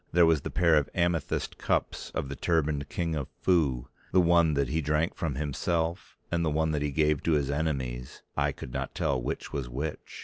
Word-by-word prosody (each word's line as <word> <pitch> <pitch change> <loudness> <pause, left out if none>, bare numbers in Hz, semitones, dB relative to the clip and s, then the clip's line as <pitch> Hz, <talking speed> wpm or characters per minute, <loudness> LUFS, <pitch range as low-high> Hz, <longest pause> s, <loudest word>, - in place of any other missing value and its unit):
There 85 0 +6
was 80 -3 +3
the - - -4
pair 85 -2 +4
of 75 - +1
amethyst 85 -3 0
cups - - -1
of - - -1
the 70 - -5
turbaned 75 -4 0
King 85 +2 -1
of 70 -4 -2
Foo, 75 -10 +2 0.2
the 95 - +5
one 85 -3 +4
that 70 -3 +1
he 80 +2 0
drank 75 +3 +1
from 80 -7 -2
himself, 80 +4 -2
and 85 -1 +1
the 80 - +2
one 80 +1 +1
that 75 -2 -1
he 75 - 0
gave 75 0 +2
to 85 - +1
his 70 -2 +1
enemies, 65 -5 -3
eye - - +2
could - - -9
not - - -3
tell 65 -3 0
which - - -4
was 65 -4 -3
which. 70 +5 -5
75 Hz, 210 wpm, -29 LUFS, 70-85 Hz, 0.2 s, There